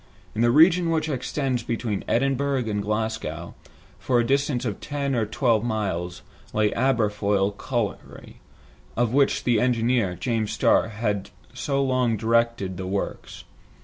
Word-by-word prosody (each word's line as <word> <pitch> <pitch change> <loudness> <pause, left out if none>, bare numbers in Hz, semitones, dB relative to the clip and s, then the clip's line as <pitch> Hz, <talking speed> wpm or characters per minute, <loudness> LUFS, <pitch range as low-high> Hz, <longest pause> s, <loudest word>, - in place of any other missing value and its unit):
In 110 - -2
the 120 - +4
region 165 +6 +5
which 160 -1 0
extends 135 -2 -1
between 115 -3 -3
Edinburgh 135 0 +1
and 105 -1 -1
Glasgow, 110 +2 -3 0.5
for 125 -2 +1
a 120 - +2
distance 140 -1 0
of 105 -4 -3
ten 140 -2 -3
or 115 -4 0
twelve 115 -1 +1
miles, 95 -7 -3 0.3
lay 105 0 +2
the - - -6
Aberfoyle 105 -5 +1
colliery, 120 -1 -4 0.6
of 120 -1 +1
which 140 0 +2
the 120 -3 +2
engineer, 120 -5 +1
James 110 +4 -2
Starr, - - +3
had 105 -3 -2 0.2
so 140 -1 -1
long 130 -4 +1
directed 115 -4 +1
the 95 0 -5
works. 100 +1 -4
115 Hz, 145 wpm, -24 LUFS, 105-130 Hz, 0.6 s, region